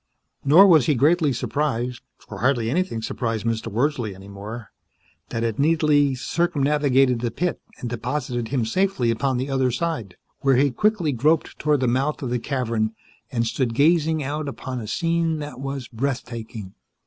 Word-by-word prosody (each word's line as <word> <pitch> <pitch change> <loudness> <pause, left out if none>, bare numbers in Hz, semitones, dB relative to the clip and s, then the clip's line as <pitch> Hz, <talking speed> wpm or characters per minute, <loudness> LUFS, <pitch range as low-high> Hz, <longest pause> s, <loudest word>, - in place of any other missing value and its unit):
Nor 160 +8 +8
was 160 -10 +5
he 150 - +3
greatly 155 +3 +3
surprised 125 -1 -2 0.2
(for - - -10
hardly 120 -3 +1
anything 155 -9 -1
surprised 115 -2 -2
Mr. 115 -1 -1
Wordsley 120 -3 -1
any 95 +1 -13
more) 105 +3 -8 0.6
that 115 - -2
it 115 0 -2
neatly 150 -2 +3
circumnavigated 140 -5 +2
the 120 - 0
pit 175 +9 -2 0.2
and 125 - -4
deposited 120 0 -3
him 125 -2 0
safely 185 - +1
upon 130 +3 0
the 130 +2 -2
other 130 -1 +2
side, 125 - -3 0.2
where 135 -1 +3
he 140 +2 +3
quickly 190 - +1
groped 150 +6 +1
toward 150 -3 +2
the 130 - +2
mouth 135 +5 0
of 125 - -3
the 125 - 0
cavern 115 -4 -1 0.4
and 115 -2 0
stood 115 0 -1
gazing 160 +2 +3
out 145 +2 -3
upon 130 -2 -5
a 110 - -7
scene 165 - 0
that 145 -3 -7
was 135 -2 -4
breathtaking. 115 -5 -5
130 Hz, 165 wpm, -23 LUFS, 115-150 Hz, 0.6 s, Nor